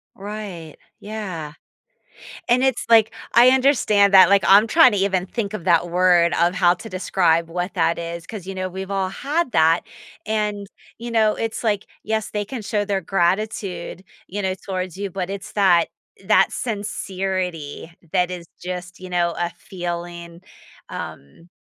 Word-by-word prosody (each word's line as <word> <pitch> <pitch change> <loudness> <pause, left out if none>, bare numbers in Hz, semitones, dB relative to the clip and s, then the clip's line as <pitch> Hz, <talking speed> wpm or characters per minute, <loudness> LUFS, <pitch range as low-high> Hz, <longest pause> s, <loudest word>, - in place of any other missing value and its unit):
Right. 195 -6 -7 0.2
Yeah. 190 -8 -6 1.0
And 250 +2 +3
it's 260 -2 +1
like, 225 -1 +6 0.2
I 245 +2 +8
understand 245 -7 +3
that, 190 -2 +9
like, 200 0 +4
I'm 205 +3 +7
trying 255 -1 +6
to 205 - 0
even 190 -2 +1
think 215 0 -4
of 180 - -6
that 175 -1 +2
word 175 -1 +4
of 175 +2 +3
how 180 -1 +4
to 225 +5 -10
describe 170 -3 +1
what 175 +2 -4
that 170 -2 +1
is, 170 0 -6
'cause, 200 -5 -8
you 195 - -5
know, 185 0 -3
we've 190 +1 -7
all 195 -1 0
had 285 - -2
that, 165 +1 +4 0.4
and, 210 -2 -1 0.3
you 235 +1 -6
know, 220 -2 +3
it's 225 +1 -3
like, 210 -3 0 0.2
yes, 220 0 -2
they 210 -1 -2
can 225 +2 -6
show 205 0 -1
their 195 -1 -1
gratitude, 185 0 -1 0.2
you 205 +2 -5
know, 190 -1 -1
towards 185 -2 -5
you, 200 0 -4
but 185 0 -4
it's 200 0 -7
that 185 -5 +4 0.4
that 210 +2 +4
sincerity 185 - -4 0.2
that 180 -1 +2
is 175 -2 -7 0.2
just, 180 0 -6
you 185 0 -9
know, 175 -1 0
a 175 0 -1
feeling. 175 -1 -7 0.5
Um 70 - -9
190 Hz, 165 wpm, -21 LUFS, 175-210 Hz, 1.0 s, that